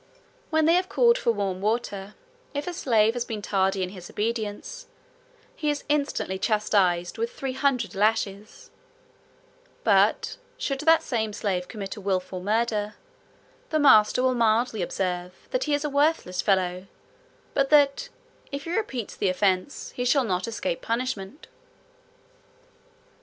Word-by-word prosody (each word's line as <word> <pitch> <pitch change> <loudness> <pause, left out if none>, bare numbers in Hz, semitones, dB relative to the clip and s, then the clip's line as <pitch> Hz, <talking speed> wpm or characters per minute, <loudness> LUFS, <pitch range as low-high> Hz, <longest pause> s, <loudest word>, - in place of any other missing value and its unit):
When 315 -1 +2
they 330 - +5
have 365 +1 +2
called 475 0 +4
for 235 - +2
warm 195 -4 -2
water, 210 -2 -2 0.4
if 285 - -2
a 360 - -4
slave 225 -8 +2
has 245 -1 -2
been 220 -3 -6
tardy 195 -1 +1
in 180 - -3
his 180 -2 -10
obedience, 225 - -4 0.7
he 300 - -1
is 290 -1 -2
instantly 280 -10 -1
chastised 195 - +1
with 460 +1 -1
three 270 - -4
hundred 260 -3 0
lashes: 210 0 -1 1.1
but - - +3 0.2
should 275 -1 -2
the 325 +2 +6
same 220 -4 -2
slave 190 -3 -2
commit 200 -4 -6
a - - -8
wilful 185 -1 -2
murder, 215 +1 0 0.7
the 315 - +1
master 250 -4 +5
will 260 0 +3
mildly 230 -2 +2
observe, 180 0 -2 0.2
that - - 0
he 300 - 0
is 290 +1 -2
a - - +2
worthless 285 - +1
fellow; 185 -1 0 0.7
but 275 -1 +1
that, 290 - +4 0.4
if 280 0 -4
he 335 +2 -3
repeats 265 - -3
the 195 - 0
offence, 185 +5 0
he 245 - -2
shall 260 +2 +3
not 185 -4 -1
escape 220 -6 -3
punishment. 230 - -3
220 Hz, 145 wpm, -26 LUFS, 195-280 Hz, 1.1 s, the